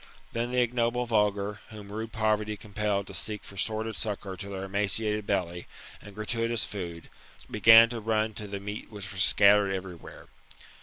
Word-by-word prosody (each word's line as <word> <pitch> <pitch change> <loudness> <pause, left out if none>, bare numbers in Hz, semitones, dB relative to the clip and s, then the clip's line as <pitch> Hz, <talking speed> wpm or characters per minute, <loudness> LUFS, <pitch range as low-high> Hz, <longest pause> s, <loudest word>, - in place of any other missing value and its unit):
Then 115 +1 -1
the 125 0 0
ignoble 120 0 0
vulgar, 105 -2 0
whom 105 -2 -10
rude 110 +2 -5
poverty 105 -1 0
compelled 105 -1 -2
to 100 - -11
seek 105 +5 -2
for 100 - -11
sordid 110 +2 -1
succour 100 -3 -3
to 100 -1 -7
their 95 -1 -5
emaciated 105 +2 0
belly, 90 -3 -2 0.3
and 100 -2 -13
gratutious 115 -1 -1
food, 85 -5 -7 0.4
began 115 +1 +8
to 120 -1 -4
run 110 0 0
to 105 +1 -7
the 100 0 -5
meat 105 +2 -7
which 100 -2 -7
was 95 -1 -2
scattered 100 0 +5
every 95 -1 -4
where. 85 - -13
105 Hz, 170 wpm, -28 LUFS, 100-110 Hz, 0.4 s, began